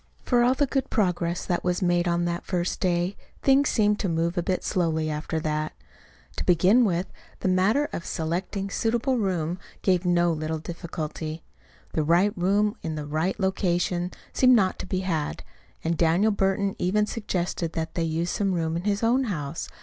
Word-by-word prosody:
For 245 -2 +3
all 250 +2 +4
the 285 - +2
good 270 -1 -1
progress 175 -5 0
that 175 - -1
was 180 +1 0
made 175 0 +2
on 175 0 +1
that 175 0 -2
first 180 -1 -2
day, 180 +1 0 0.3
things 275 +1 +4
seemed 210 -2 +2
to 195 - -1
move 165 +1 0
a 175 - +1
bit 185 +2 -1
slowly 160 -4 0
after 155 +2 -2
that. 155 0 -2 0.6
To - - -1
begin 185 +8 +5
with, 180 -2 0 0.4
the - - 0
matter 195 +11 +3
of 170 - -4
selecting 180 +5 -3
a - - -12
suitable 240 +4 +1
room 180 -4 -1 0.2
gave 185 -2 +3
no 175 -1 +3
little 155 +1 -2
difficulty. 160 -1 -5 0.5
The 155 - +1
right 175 +7 +3
room 205 +5 +1
in 160 -1 -3
the 150 -1 -4
right 160 +7 -1
location 180 -2 0 0.2
seemed 255 -1 +6
not 190 -5 +2
to - - -5
be 185 0 -1
had; 160 -5 -2 0.4
and 165 +1 0
Daniel 170 +7 +3
Burton 195 0 0
even 210 +4 +2
suggested 180 -6 -2
that 160 -1 -3
they 170 - -1
use 165 +1 -1
some 195 -3 0
room 165 -1 -1
in 170 +3 -3
his 205 +1 0
own 250 +4 +3
house. 160 - -4
180 Hz, 185 wpm, -26 LUFS, 165-200 Hz, 0.6 s, seemed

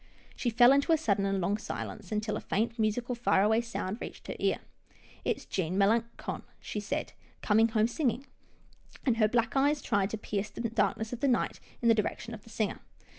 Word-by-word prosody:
She 245 - 0
fell 240 +2 +7
into 280 +4 +3
a 325 - +6
sudden 200 -9 +1
and 195 0 0
long 195 +4 0
silence, 210 -2 -6
until 210 0 -1
a - - -3
faint, 230 +3 -1
musical, 230 +3 0
far 235 -5 +3
away 220 +2 +4
sound 225 -2 -4
reached - - -7
her - - -5
ear. - - +2 0.4
" - - -25
It's - - -1
Jean 185 -1 -2
Melangon," 230 +4 +1 0.2
she 210 - -4
said, 205 - -3
" - - -32
coming 220 +2 +5
home 220 -1 +2
singing," 250 +1 -1 0.8
and 245 -4 +2
her 215 -2 +5
black 235 +2 +1
eyes 285 +2 +3
tried 200 -6 +1
to 220 - -3
pierce 210 0 -3
the 210 - -7
darkness 220 0 0
of 245 - -4
the 280 - +2
night 245 -3 +1 0.2
in - - +3
the 230 - +7
direction 225 +1 -2
of 215 - -8
the - - -16
singer. 215 -1 -2
220 Hz, 210 wpm, -30 LUFS, 210-240 Hz, 0.8 s, fell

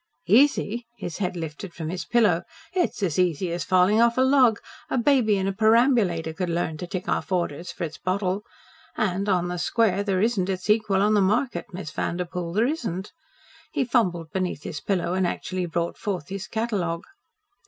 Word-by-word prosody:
"Easy!" 240 -2 +3
his 175 -5 -6
head 185 -2 -1
lifted 165 +2 -6
from 160 -2 -4
his 180 0 -4
pillow. 210 -8 +3 0.3
"It's 355 - 0
as 175 -3 0
easy 180 -1 +1
as 170 0 -2
falling 185 +4 +4
off 235 +1 +3
a - - +4
log. 260 -4 +5 0.3
A - - 0
baby 240 -5 +3
in 190 0 -1
a 195 - 0
perambulator 220 -7 +3
could 180 +2 -3
learn 165 -2 -1
to 180 - -6
tick 185 +1 -5
off - - -1
orders 170 -1 -1
for 170 - -6
its 160 -2 -5
bottle. 185 +1 -1 0.6
And 200 0 0
on 180 -2 +2
the 180 0 -3
square 200 +1 +2
there 195 -2 0
isn't 205 -3 +1
its 190 +2 0
equal 210 -3 +2
on 210 +1 +3
the 205 - +4
market, 220 +7 +1
Miss 180 -3 -6
Vanderpoel 175 0 -3
there 215 +4 +3
isn't." 220 - -3 0.6
He 280 -4 +1
fumbled 180 -10 0
beneath 185 -5 -2
his 150 - -5
pillow 180 -3 0
and 185 -1 +1
actually 185 +1 -3
brought 170 0 -2
forth 185 -8 -3
his 195 0 -5
catalogue. 195 -7 -2
190 Hz, 185 wpm, -25 LUFS, 175-220 Hz, 0.6 s, log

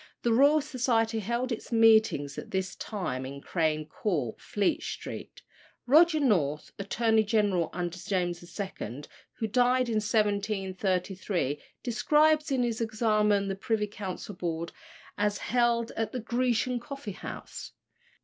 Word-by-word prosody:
(The 235 - +3
Royal 285 +5 +5
Society 235 -5 0
held 235 +4 -2
its 230 - -5
meetings 220 -10 +4
at - - -9
this 190 -1 -2
time 180 - -4
in 140 +2 -7
Crane 155 0 0
Court, 150 - -2
Fleet 205 -2 0
Street.) - - -7 0.4
Roger 315 +4 +6
North, 160 - +1
Attorney 220 +2 +2
General 205 -6 +1
under 175 0 -4
James 175 -3 -1
II., 170 - -6 0.3
who 225 - -3
died 250 +2 +2
in 220 - +1
1733, 195 - -1 0.2
describes 300 +5 +3
in 260 -2 +2
his 235 -1 -1
Examen 215 -2 +2
the 195 - -2
Privy 210 +2 0
Council 205 -1 -6
Board, 170 -2 -3 0.5
as 205 0 +1
held 235 -1 +1
at 220 -1 -2
the 255 - -2
Grecian 245 +1 0
coffee 275 -3 -7
house. - - -8
215 Hz, 130 wpm, -29 LUFS, 185-235 Hz, 0.5 s, Roger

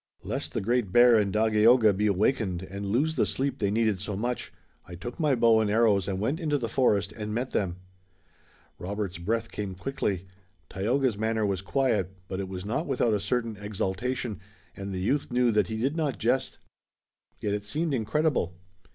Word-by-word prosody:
Lest - - -4
the - - -1
Great 115 -1 0
Bear 120 +2 +7
and 105 -3 +2
Dagaeoga 110 +1 +5
be 105 +2 +1
awakened 100 -2 +1
and 100 +1 -6
lose 145 +10 +1
the - - +3
sleep 135 0 -1
they 100 - +1
needed 110 -2 +1
so 105 0 -3
much, 120 +5 -3 0.4
I 90 - -8
took 120 - -7
my 150 -4 +3
bow 115 -2 +5
and 110 -2 +1
arrows 105 -3 +3
and 95 -1 -2
went 135 - -1
into 150 -4 0
the 120 -4 -3
forest 105 -6 +2
and 105 -1 -5
met 125 +2 -2
them." 90 -4 -1 1.0
Robert's 100 -1 -4
breath 115 +5 -2
came 100 -3 -4
quickly. 95 -4 -2 0.5
Tayoga's 120 +2 0
manner 110 0 0
was 95 -2 -1
quiet, 125 -3 0
but 95 - -4
it 95 -1 -4
was 95 0 -6
not 135 +10 -2
without 125 -4 +1
a 105 - +1
certain 115 0 -1
exultation, 105 +2 -3 0.4
and 100 0 -6
the 95 - -3
youth 135 +10 0
knew 125 -1 +3
that 105 -4 +2
he 110 - -4
did 135 +7 0
not 150 -8 -1
jest. - - 0 0.8
Yet 105 - -1
it 105 0 -2
seemed 155 +9 -1
incredible. 130 - 0
110 Hz, 185 wpm, -27 LUFS, 100-125 Hz, 1.0 s, Bear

